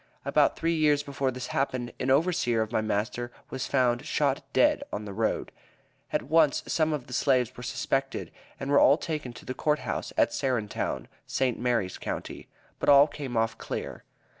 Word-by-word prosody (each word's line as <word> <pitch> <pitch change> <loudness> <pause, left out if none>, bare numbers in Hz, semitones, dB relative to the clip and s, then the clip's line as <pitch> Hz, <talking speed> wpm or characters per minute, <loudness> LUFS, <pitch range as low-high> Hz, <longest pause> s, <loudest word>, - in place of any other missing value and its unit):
About - - +3
three 165 +1 0
years 150 -2 +3
before 140 -1 -1
this 130 0 -5
happened, 130 -3 -1
an 130 - -1
overseer 135 -6 +2
of 110 - -8
my 110 - +1
master 110 +3 -2 0.2
was 130 -1 -3
found 125 -3 +2
shot - - 0
dead - - +4
on 105 - -4
the 100 - -6
road. 110 +2 -1 0.6
At - - 0
once 155 +2 +3
some 155 -1 +1
of 145 -5 -3
the 125 - -10
slaves 130 -3 +2
were - - -9
suspected, 135 +2 -2 0.3
and 135 0 -3
were 140 - +6
all 140 - +6
taken 155 -7 -4
to - - -12
the 130 - -3
Court 150 +3 +1
House, - - -3
at - - +3
Serentown, 125 -7 -2 0.2
St. 130 -3 0
Mary's 115 -7 0
county; - - -5 0.3
but - - +1
all 140 0 +9
came 140 -5 -5
off 115 0 0
clear. - - -5
130 Hz, 185 wpm, -28 LUFS, 120-145 Hz, 0.6 s, all